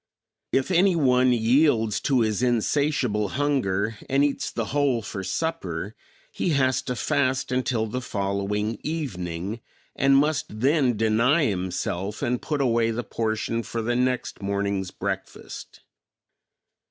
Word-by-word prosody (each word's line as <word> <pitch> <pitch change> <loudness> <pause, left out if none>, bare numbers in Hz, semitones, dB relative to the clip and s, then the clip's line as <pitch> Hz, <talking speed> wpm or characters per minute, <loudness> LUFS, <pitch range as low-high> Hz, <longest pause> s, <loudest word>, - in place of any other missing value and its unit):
If 135 +7 +1
any 185 +1 +4
one 130 -4 +4
yields 115 -2 +3
to 130 -4 +2
his 110 0 0
insatiable 120 -3 +1
hunger 115 -8 0
and 135 +1 +3
eats 145 -1 0
the 115 - -3
whole 140 -6 +2
for 95 -2 -5
supper 100 - -3 0.4
he - - -1
has 130 -1 +2
to 125 - -1
fast 135 -1 0
until 125 -3 0
the 125 +4 -4
following 105 0 -2
evening 100 - -4 0.3
and 135 0 +4
must 140 -7 0
then 135 -4 +3
deny 115 +8 +3
himself 95 0 -2
and 120 0 0
put 150 -2 -2
away 115 -3 +2
the 115 +2 -2
portion 110 +1 -2
for 115 0 -4
the 120 +2 0
next 125 -2 -1
morning's 100 -1 -1
breakfast. - - -6
120 Hz, 130 wpm, -25 LUFS, 105-135 Hz, 0.4 s, any